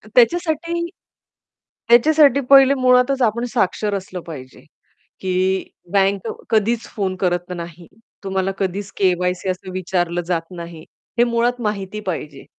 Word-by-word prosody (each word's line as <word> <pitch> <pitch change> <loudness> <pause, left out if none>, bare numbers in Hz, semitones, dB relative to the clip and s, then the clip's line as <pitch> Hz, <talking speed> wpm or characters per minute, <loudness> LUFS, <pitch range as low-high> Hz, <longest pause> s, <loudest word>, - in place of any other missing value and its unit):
त्याच्यासाठी 335 +5 +2 1.0
त्याच्यासाठी 280 +2 +5
पहिले 275 0 +8
मुळातच 255 +1 +3
आपण 235 +2 +1
साक्षर 210 -1 0
असलं 185 -2 -6
पाहिजे, 130 -5 -10 0.6
की 185 0 0 0.2
बँक 195 -1 +2 0.2
कधीच 225 +1 +1
फोन 190 -3 -1
करत 175 -1 0
नाही. 170 0 -9 0.4
तुम्हाला 190 0 -1
कधीच 195 +1 -3
के-वाय-सी 180 -1 +1
असं 185 0 -4
विचारलं 175 -1 -1
जात 175 -2 0
नाही. 170 -2 -8 0.4
हे 240 - +7
मुळात 240 +1 0
माहिती 210 -1 -3
पाहिजे 155 -7 -5
195 Hz, 120 wpm, -20 LUFS, 180-240 Hz, 1.0 s, पहिले